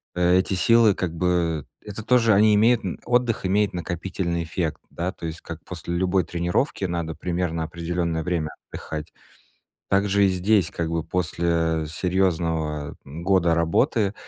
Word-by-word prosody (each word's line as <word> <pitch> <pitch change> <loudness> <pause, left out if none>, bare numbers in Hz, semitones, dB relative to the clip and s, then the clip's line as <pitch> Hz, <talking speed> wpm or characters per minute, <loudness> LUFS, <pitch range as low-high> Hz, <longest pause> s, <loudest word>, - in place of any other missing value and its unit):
э, 90 +1 +4
эти 95 - -1
силы, 115 +2 +5
как 85 -2 -3
бы 85 -3 0 0.2
это 105 +1 -7
тоже, 115 -2 +4
они 105 +2 +5
имеют 115 +3 +4
н 90 - -4
отдых 120 -4 +1
имеет 105 +1 +2
накопительный 85 0 -3
эффект, 80 -1 -3
да. 90 +2 -3
То 85 - -9
есть 80 +1 -7
как 85 -1 -8
после 85 -1 -5
любой 95 +1 +2
тренировки 90 - -1
надо 85 -3 -3
примерно 85 0 -2
определённое 85 0 -2
время 85 -3 -1 0.2
отдыхать. 75 -1 -6 0.8
Так 100 +1 +2
же 100 +1 +3
и - - +4
здесь, 95 0 +2
как 85 -3 -2
бы, 85 -1 -1
после, 85 -2 0
э, - - -6
серьёзного 80 -4 -1
года 85 +3 +1
работы 95 +5 +1
90 Hz, 155 wpm, -24 LUFS, 80-95 Hz, 0.8 s, силы